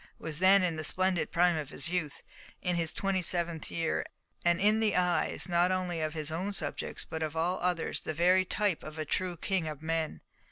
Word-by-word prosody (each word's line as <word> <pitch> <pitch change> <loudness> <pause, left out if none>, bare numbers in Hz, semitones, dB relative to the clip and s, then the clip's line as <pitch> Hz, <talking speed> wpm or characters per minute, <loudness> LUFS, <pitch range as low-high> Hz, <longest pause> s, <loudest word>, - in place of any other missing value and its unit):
was 155 -1 -6
then 190 +1 +6
in 170 -3 0
the 155 - -3
splendid 185 +2 +1
prime 175 0 +4
of 155 -3 -4
his - - 0
youth, 170 -5 -3 0.4
in 180 -1 +1
his 165 -2 0
twenty 195 -1 0
seventh 170 -2 -1
year, 165 -1 -1 0.4
and 175 0 +3
in 210 +2 +4
the 215 -2 +2
eyes, 180 +1 +1
not 175 +1 +3
only 180 -3 -1
of 155 0 -2
his 155 0 -1
own 180 +5 -2
subjects, 160 -7 -4
but 160 - -5
of 155 0 -2
all 175 +3 0
others, 175 -2 -1
the - - -3
very 180 +4 +4
type 195 -1 0
of 155 +1 -8
a 155 - -2
true 180 +3 -1
king 185 -1 -1
of 150 -1 -6
men. 160 -1 -2
175 Hz, 210 wpm, -30 LUFS, 160-185 Hz, 0.4 s, then